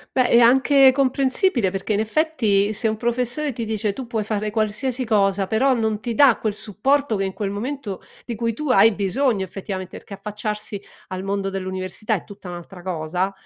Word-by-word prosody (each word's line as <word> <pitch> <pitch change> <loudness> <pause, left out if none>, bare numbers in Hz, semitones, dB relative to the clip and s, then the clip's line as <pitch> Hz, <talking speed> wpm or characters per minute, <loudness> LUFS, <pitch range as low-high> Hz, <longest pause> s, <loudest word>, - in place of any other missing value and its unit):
Beh, 255 -2 +3
è 235 - +6
anche 265 +3 +6
comprensibile, 265 - +2
perché 195 +3 -3
in 205 - +1
effetti 220 -5 +1
se 220 +2 +1
un 215 - -1
professore 250 +5 0
ti 230 -1 -4
dice: 215 -2 -1
"Tu 260 0 -7
puoi 225 -3 -2
fare 210 0 -2
qualsiasi 225 +4 0
cosa", 200 -3 +2
però 240 +7 +2
non 220 -2 -1
ti 230 +1 -4
dà 275 -5 +5
quel 215 -2 -1
supporto 250 +5 0
che 195 - -1
in 190 -1 -3
quel 200 -1 -3
momento 215 -1 -5 0.2
di 240 - -4
cui 230 0 -2
tu 300 +5 -4
hai 225 -3 +6
bisogno 205 +2 +1
effettivamente, 185 0 -6
perché 200 - -10
affacciarsi 210 0 -5 0.3
al 185 0 -4
mondo 195 0 -2
dell'università 190 +3 -3
è 180 - -5
tutta 200 -2 -12
un'altra 175 +1 -9
cosa. 180 +2 -2
215 Hz, 185 wpm, -22 LUFS, 195-245 Hz, 0.3 s, è